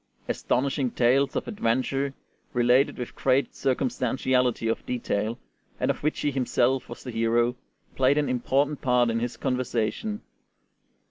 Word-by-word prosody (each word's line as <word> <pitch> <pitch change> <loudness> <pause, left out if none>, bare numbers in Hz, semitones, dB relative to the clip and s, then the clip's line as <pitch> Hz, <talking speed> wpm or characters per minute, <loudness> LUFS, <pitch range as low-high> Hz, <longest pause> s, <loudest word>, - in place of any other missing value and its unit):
Astonishing 135 +1 0
tales 130 +4 +2
of - - -2
adventure, 135 - -1 0.4
related 125 +3 +3
with 125 - -6
great 135 +1 +1
circumstantiality 125 -2 0
of 115 - -1
detail, 115 -2 -2 0.4
and - - +2
of - - -7
which 150 +1 -1
he 145 - +1
himself 130 -1 +1
was 120 - -9
the 125 - -6
hero, 115 +1 +1 0.4
played 135 +2 +3
an 150 -1 +2
important 135 +4 0
part 125 -2 +3
in 115 - 0
his 120 +1 -3
conversation. 130 - -2
125 Hz, 135 wpm, -26 LUFS, 120-135 Hz, 0.4 s, related